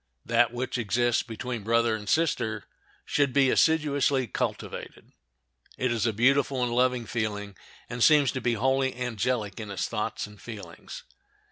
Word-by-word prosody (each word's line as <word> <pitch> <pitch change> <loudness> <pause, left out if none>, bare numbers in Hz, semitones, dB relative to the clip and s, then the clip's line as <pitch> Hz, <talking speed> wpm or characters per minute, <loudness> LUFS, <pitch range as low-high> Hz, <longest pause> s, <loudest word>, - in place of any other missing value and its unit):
That 115 0 +3
which 125 +1 -3
exists 120 +2 +1
between 120 0 -5
brother 115 +1 +2
and 105 -1 -7
sister 120 -10 0 0.4
should 140 -3 +1
be 135 -2 +4
assiduously 145 -4 +2
cultivated. - - -5 0.7
It 125 -1 0
is 115 -1 0
a - - +2
beautiful 130 +3 +2
and 120 -1 -1
lovely 125 -1 +2
feeling, 105 -3 -3 0.3
and 120 0 -2
seems 150 -4 +5
to 130 - -4
be 120 0 +1
wholly 130 +3 +1
angelic 120 -3 -2
in 105 -2 -6
its 100 -2 -2
thoughts - - -3
and 105 -1 -14
feelings. 110 -4 -9
120 Hz, 150 wpm, -27 LUFS, 110-130 Hz, 0.7 s, seems